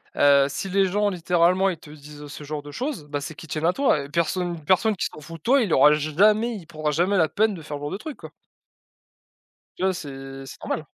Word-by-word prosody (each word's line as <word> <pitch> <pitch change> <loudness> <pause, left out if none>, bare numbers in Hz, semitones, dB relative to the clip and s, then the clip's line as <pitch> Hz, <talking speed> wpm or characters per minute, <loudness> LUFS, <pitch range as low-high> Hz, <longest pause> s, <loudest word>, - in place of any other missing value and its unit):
Heu, 140 -1 +5
si 165 +7 -4
les 195 +1 +3
gens, 205 +2 +1
littéralement, 180 +2 +2
ils 175 - -3
te 150 -1 -14
disent 150 0 -11
ce 145 +1 -9
genre 145 0 -5
de 145 - -10
choses, 255 - -4
bah 145 -1 -4
c'est 160 +2 -7
qu'ils 165 - -11
tiennent 155 +2 -3
à 180 - +3
toi 270 - +2
et 140 - -10
personne 170 +3 0
une 155 -3 -13
personne 205 +4 +3
qui - - -2
s'en - - -6
fout 165 +3 -10
de - - -28
toi, 270 +2 +4
il 200 -7 -1
aura 145 +3 +6
jamais 210 +10 +2
il 180 -5 -9
prendra 155 -2 -3
jamais 175 +7 +1
la 160 -4 +3
peine 220 0 +1
de 170 - -8
faire 150 -1 -6
ce - - -11
genre 145 - -4
de 190 - -3
truc, 300 +5 -8
quoi. - - -11 1.5
Tu - - -4
vois? 190 0 +2
C'est 135 -4 -8
c'est 135 - -11
normal. 155 - -3
165 Hz, 255 wpm, -24 LUFS, 145-195 Hz, 1.5 s, aura